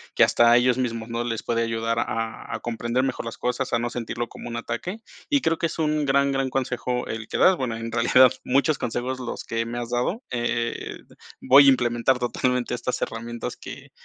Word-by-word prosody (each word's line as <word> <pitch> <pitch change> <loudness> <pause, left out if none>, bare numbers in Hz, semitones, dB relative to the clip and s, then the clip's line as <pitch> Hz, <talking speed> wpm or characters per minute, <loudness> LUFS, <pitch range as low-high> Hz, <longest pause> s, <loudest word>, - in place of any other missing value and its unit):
que - - +6
hasta 120 0 +5
ellos 125 0 +3
mismos, 115 -3 -2
¿no?, 115 +1 -2
les 115 -2 -3
puede 115 0 0
ayudar 115 0 -1
a 115 -1 -3
a - - -5
comprender 120 +2 -1
mejor 135 - -2
las 115 - -6
cosas, 125 +1 -2
a - - +4
no 120 0 -2
sentirlo 120 0 -4
como - - -10
un 115 - -5
ataque. 120 - -4 0.3
Y 285 -2 +3
creo 165 -4 +1
que 165 - +1
es - - -7
un 155 -2 +1
gran, 140 0 +3
gran 135 -1 0
consejo 125 -1 -2
el 115 0 -5
que - - -3
das, 185 - +6
bueno, 125 -7 -3
en 115 0 -5
realidad, 120 +2 +5
muchos 140 +3 +2
consejos 125 +3 -3
los 125 -2 -5
que 115 0 -2
me 120 +1 -5
has 120 0 -5
dado. 125 - -1
Eh, 120 -1 -2 0.4
voy 140 +2 +7
a - - +10
implementar 120 0 +2
totalmente 125 0 -1
estas 125 +1 -2
herramientas 115 +1 -5
que - - -10
120 Hz, 210 wpm, -24 LUFS, 115-130 Hz, 0.4 s, a